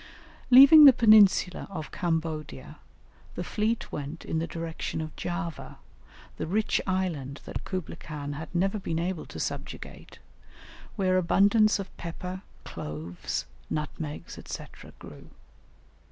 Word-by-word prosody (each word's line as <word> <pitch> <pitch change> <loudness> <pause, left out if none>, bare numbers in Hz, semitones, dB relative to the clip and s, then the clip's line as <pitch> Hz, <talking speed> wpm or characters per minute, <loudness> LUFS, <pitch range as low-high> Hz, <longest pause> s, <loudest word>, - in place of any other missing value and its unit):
Leaving 280 +4 +10
the 275 - +10
peninsula 215 -5 +5
of 160 -6 -7
Cambodia, 160 -3 -3 0.6
the - - -3
fleet 220 +2 -2
went 150 +3 -6
in 160 - -1
the 165 - -2
direction 165 -1 -5
of 155 -1 -6
Java, 175 -2 -5 0.6
the - - -4
rich 210 +5 +1
island 165 -8 -2
that - - -6
Kublaï 185 -4 -5
Khan 145 -2 -6
had 155 +3 -7
never 195 +4 +1
been 165 -4 -3
able 175 0 -3
to - - -9
subjugate, - - -6 0.8
where 185 -2 +2
abundance 205 +4 +4
of 195 -2 -8
pepper, 180 +2 -6 0.2
cloves, 80 +3 -5 0.2
nutmegs, 150 0 -5
&c., - - -6 0.3
grew. - - -13
175 Hz, 125 wpm, -27 LUFS, 155-195 Hz, 0.8 s, Leaving